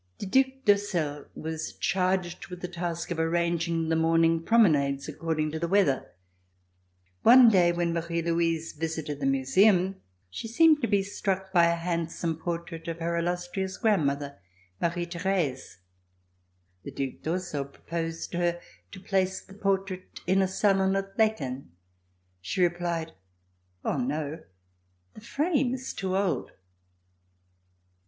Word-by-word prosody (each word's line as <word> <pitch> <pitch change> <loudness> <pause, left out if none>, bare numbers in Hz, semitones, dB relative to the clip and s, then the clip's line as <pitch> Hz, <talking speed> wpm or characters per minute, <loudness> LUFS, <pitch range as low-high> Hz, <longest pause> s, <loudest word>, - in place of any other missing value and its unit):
The - - -5
Due 265 +7 +3
d'Ursel 175 -8 +1
was 160 0 -5
charged 185 -1 -1
with 180 -1 -9
the 180 - -3
task 170 -1 -4
of 165 - -2
arranging 165 0 0
the 165 - +2
morning 165 0 +3
promenades, 150 -10 +3
according 155 -2 -2
to 160 - -4
the 170 - -1
weather. 175 -8 +2 1.1
One 245 0 +8
day 180 -5 +4
when 170 -1 -1
Marie 170 0 -2
Louise 165 -1 0
visited 160 -2 -4
the 135 - 0
Museum 185 +8 +3 0.3
she 225 - -6
seemed 305 +6 +5
to 235 - +1
be 200 -2 +2
struck 190 -1 -3
by 170 -2 +6
a 170 0 +2
handsome 170 -1 -2
portrait 165 0 -5
of 165 -1 -3
her 170 0 -2
illustrious 175 +2 -2
grandmother, 145 - 0 0.4
Marie 175 +1 0
Therese. 170 - -2 1.0
The - - -8
Due 135 -2 -4
d'Ursel 160 -4 -3
proposed 165 +3 -5
to 175 - -2
her 175 0 0 0.3
to - - -8
place 190 0 0
the 195 - -16
portrait 195 -2 -2
in 190 +1 +3
a 190 - +2
salon 190 0 +2
at 195 0 -3
Laeken. 140 - 0 0.7
She 95 - -1
replied: 170 -2 -1 0.7
0h 125 -3 0
n(j, 155 +2 -4 0.7
the - - -13
frame 275 +1 0
is 260 0 -6
too 190 -1 -2
old!" 195 -3 0
170 Hz, 135 wpm, -27 LUFS, 160-190 Hz, 1.1 s, One